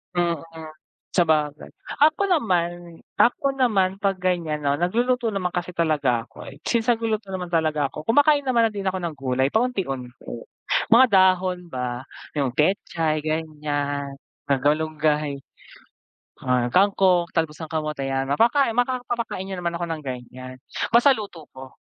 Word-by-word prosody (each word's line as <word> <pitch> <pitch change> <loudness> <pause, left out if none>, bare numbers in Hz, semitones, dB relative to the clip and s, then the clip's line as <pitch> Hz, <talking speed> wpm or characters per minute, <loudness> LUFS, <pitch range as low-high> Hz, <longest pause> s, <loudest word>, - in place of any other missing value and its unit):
Mm, 170 -3 0 0.7
sabagay. 155 -4 +1 0.3
Ako 315 +6 +4
naman 175 - -1 0.2
ako 270 +3 +2
naman, 200 -8 +2
'pag 195 -1 0
ganyan 175 -4 -1
'no, 140 0 +2
nagluluto 235 - 0
naman 185 -3 -2
kasi 175 0 -2
talaga 145 -9 0
ako. - - -11 0.2
Since, 235 0 +2
nagluluto 220 -3 -2
naman 180 -1 -4
talaga 155 -3 +1
ako, 155 - -7
kumakain 290 +4 +4
naman 235 -3 +4
na - - -6
din 195 -1 -4
ako 190 0 -1
ng 170 -3 -4
gulay 130 -1 0
paunti-unti, 190 - -1 0.8
mga 240 +3 +8
dahon 185 -2 +3
ba. 125 -1 -4 0.3
Yung 135 -4 0
pechay, 155 -2 0
ganyan, 145 -3 -3 0.3
malungay, 150 +1 +1 1.0
ah, 125 -1 +1
kangkong, 185 -1 +3
talbos 160 -2 -1
ng 155 - -7
kamote 155 -3 -2
'yan, 135 0 -2
mapaka 235 - +3
maka 245 +1 0
papakain 230 -5 -3
niyo 190 -1 -5
naman 170 -1 -2
ako 175 - -3
ng 155 -1 -4
ganyan, 130 0 -7 0.4
basta 245 +4 +7
luto 195 - -8
ko. 130 0 -11
170 Hz, 140 wpm, -23 LUFS, 145-200 Hz, 1.0 s, mga